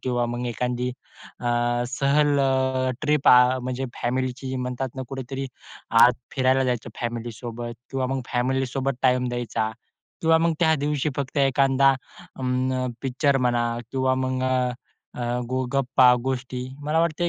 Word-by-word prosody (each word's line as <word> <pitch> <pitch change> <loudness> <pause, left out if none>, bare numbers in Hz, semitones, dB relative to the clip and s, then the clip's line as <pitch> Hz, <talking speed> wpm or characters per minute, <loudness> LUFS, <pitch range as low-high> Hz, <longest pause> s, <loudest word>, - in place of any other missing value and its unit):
किंवा 120 -2 0
मग 120 +1 -3
एखादी 125 +1 -2 0.5
अ, - - -9 0.4
सहल 140 +3 +2 0.6
ट्रिप 150 -2 +2
अ, 125 +1 +6
म्हणजे 130 +1 -3 0.2
फॅमिलीची 130 +1 -2
म्हणतात 125 +1 -3
ना 130 - -3
कुठेतरी 135 0 -5 0.6
आत 125 - +8 0.2
फिरायला 130 0 +3
जायचं 120 -3 -2
फॅमिलीसोबत. 120 0 -5 0.2
किंवा 135 -1 -1
मग 135 0 -2
फॅमिलीसोबत 130 +2 0
टाईम 125 -1 +3
द्यायचा 120 -2 -2 0.5
किंवा 165 0 +5
मग 165 0 +2
त्या 160 -2 +4
दिवशी 145 +1 -1
फक्त 140 +1 -3
एखादा 135 0 +4 0.5
अं, 130 0 -1
पिक्चर 135 +2 +1
म्हणा 120 -2 +1 0.3
किंवा 130 -1 +1
मग 130 0 -1
अ, 130 -1 +1 0.5
अ, - - -2 0.3
गो 130 0 -1
गप्पा 130 -2 +5
गोष्टी. 130 -1 -3 0.2
मला 155 +2 +2
वाटतं 170 +1 +1
130 Hz, 135 wpm, -24 LUFS, 125-135 Hz, 0.6 s, आत